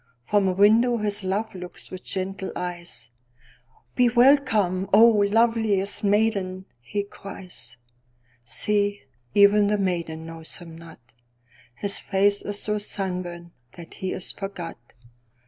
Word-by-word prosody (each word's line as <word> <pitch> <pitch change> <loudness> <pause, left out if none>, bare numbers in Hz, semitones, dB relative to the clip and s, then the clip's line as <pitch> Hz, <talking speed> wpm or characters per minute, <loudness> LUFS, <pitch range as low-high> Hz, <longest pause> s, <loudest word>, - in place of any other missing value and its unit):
From 200 - +2
a 185 - +1
window 225 +5 +4
his 205 -2 0
love 195 +4 -2
looks 180 -1 -8
with 185 - -8
gentle 190 0 -4
eyes."Be 125 - -5
welcome, 235 -7 +3
oh, 215 0 +6
loveliest 220 -3 +2
maiden!" 200 -3 +1
he 200 +12 -3
cries. 180 - -9 0.7
See, 205 - 0 0.3
even 205 0 +6
the 210 0 +1
maiden 170 -4 -2
knows 165 0 -7
him 165 -2 -11
not:His 120 - -5
face 200 +1 +1
is 205 0 -4
so 210 0 -1
sunburnt 180 -4 -5 0.2
that 170 -1 -12
he 190 - -4
is 185 - -4
forgot. 195 -8 -7
190 Hz, 115 wpm, -24 LUFS, 170-205 Hz, 0.7 s, oh